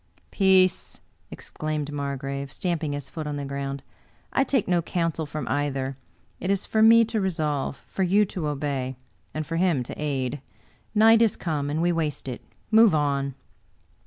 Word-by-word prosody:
" - - -34
Peace! 190 -2 +3 0.2
" - - -42
exclaimed 155 -1 -4
Margrave, 140 -1 -4
stamping 165 -4 -2
his 145 -1 -4
foot 155 +2 -6
on 150 - -3
the 145 -1 -4
ground. 140 0 -4 0.5
"I 270 - +4
take 270 -5 0
no 175 -1 +2
counsel 165 -2 -2
from 145 -2 -5
either; 135 -2 -1 0.4
it 185 - -3
is 200 0 +1
for 220 - +1
me 230 +1 +7
to 220 -1 -2
resolve, 155 -7 -1
for - - -5
you 195 +3 +4
to 180 -5 -4
obey, 140 -3 -2 0.4
and 155 0 -4
for 165 +1 -3
him 170 -7 +2
to 120 - -8
aid. 135 -2 -2 0.5
Night 225 +1 +6
is 225 -3 +3
come, 150 -4 -2
and 155 +3 0
we 175 - +3
waste 155 -5 -2
it; 125 - -5 0.3
move 220 -5 +6
on." 140 -2 0
150 Hz, 175 wpm, -25 LUFS, 140-185 Hz, 0.5 s, me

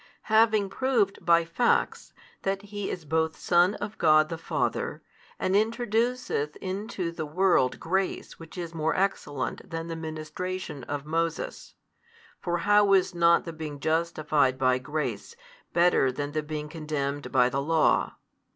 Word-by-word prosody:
Having 220 -2 +4
proved 235 -7 0
by 170 -1 +4
facts, 235 +9 0 0.3
that 195 +1 -2
He 205 -1 -5
is 170 - -5
both 160 +1 0
Son 175 +4 +3
of 205 +1 -6
God 155 -1 +5
the 165 - -4
Father, - - -2 0.3
and 185 - -1
introduceth 225 - 0
into 190 -2 -4
the 160 -2 -5
world 175 -5 +2
grace 190 +3 -2
which 165 +2 -12
is 170 -2 -5
more 160 -1 0
excellent 150 -8 -2
than 165 0 -5
the 165 - -3
ministration 160 0 -5
of 145 0 -4
Moses 165 +1 -3 0.6
(for 175 -1 -1
how 205 -1 +5
is 190 -2 +3
not 170 0 +4
the 165 - -6
being 155 -2 -6
justified 155 -4 +1
by 130 -1 +2
grace 150 - -4 0.4
better 170 -6 +3
than 145 +2 -4
the 155 +1 -1
being 150 0 -5
condemned 150 -2 -4
by 125 -2 +4
the 135 +2 -1
law?) 160 +2 +2
165 Hz, 145 wpm, -27 LUFS, 150-195 Hz, 0.6 s, God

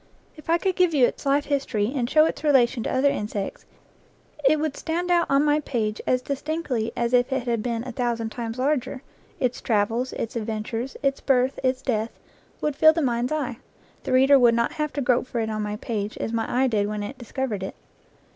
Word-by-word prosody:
If 310 +1 -14
I 335 - +4
could 375 +1 -1
give 360 -3 +3
you 260 -4 +6
its 280 - -4
life 285 +1 +2
history, 255 -6 -1
and 245 -3 -1
show 310 +1 +5
its 320 - -3
relation 260 -5 +3
to - - -2
other 275 +2 +3
insects, 210 -4 -4 0.8
it 290 +3 +4
would 305 -2 -1
stand 345 +2 -2
out 345 -1 +3
on 275 +2 +3
my 295 0 +3
page 225 -7 -2
as 255 0 +2
distinctly 280 -5 -2
as 235 +1 0
if 250 +2 +3
it 265 -2 0
had 235 -2 0
been 235 0 -2
a - - -4
thousand 230 -2 -2
times 230 0 -5
larger: 260 -1 -1 0.4
its 250 -2 -1
travels, 230 +3 0
its 225 - -4
adventures, 225 +3 -4
its 275 0 0
birth, 260 -1 +2
its 255 0 0
death, 225 -3 -2 0.4
would 300 -2 -1
fill 315 +2 +6
the 330 - -1
mind's 245 0 0
eye; 280 -6 -2 0.4
the - - -5
reader 270 +2 +6
would 240 -2 +5
not 235 0 +1
have 300 -1 -2
to 285 - -2
grope 250 -1 +2
for 240 - -3
it 220 -1 -1
on 215 0 -2
my 210 0 -3
page, 210 -1 -4
as 225 - -3
my 225 -1 -1
eye 255 +2 +2
did 210 -5 +1
when 210 0 -3
it 255 +6 -7
discovered 240 -3 -3
it. 190 - -5
255 Hz, 215 wpm, -24 LUFS, 230-280 Hz, 0.8 s, you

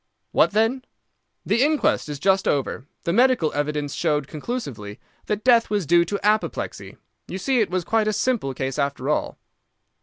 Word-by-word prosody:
"What - - +4
then?" 225 +5 +1 0.6
"The 235 - +2
inquest 295 - +2
is 145 - -4
just 190 +5 +2
over. 135 -2 -1 0.2
The 170 - -1
medical 245 -8 +3
evidence 145 0 -2
showed 150 -4 0
conclusively 140 - -6 0.3
that 210 0 -2
death 235 -2 +4
was 205 -4 0
due 170 +3 +4
to 200 +3 -3
apoplexy. 215 +1 -1 0.3
You 185 - -5
see 255 +6 +1
it 210 - 0
was 180 0 -1
quite 220 +3 +1
a 215 - +1
simple 205 - -1
case 135 +2 -3
after 140 -1 -1
all." 150 - -1
185 Hz, 170 wpm, -23 LUFS, 145-225 Hz, 0.6 s, What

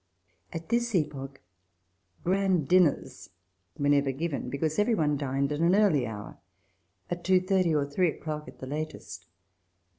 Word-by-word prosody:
At 165 +3 -7
this 235 -1 +1
epoch 140 - -3 0.8
grand 185 -4 +1
dinners 180 -3 +2 0.5
were 145 - 0
never 140 -1 +3
given, 140 -2 -3
be 140 - -4
cause 155 +4 -1
every 220 +2 +3
one 150 -5 +1
dined 140 0 -1
at 145 - -2
an 170 +3 +4
early 200 -10 +3
hour 105 -2 -8 0.3
— - - -45
at 175 0 -3
two 185 0 +4
thirty, 185 -3 +1
or 145 -1 +2
three 165 +5 +1
o'clock 150 0 -5
at - - -12
the - - -8
latest. 140 - -6
155 Hz, 160 wpm, -28 LUFS, 140-185 Hz, 0.8 s, an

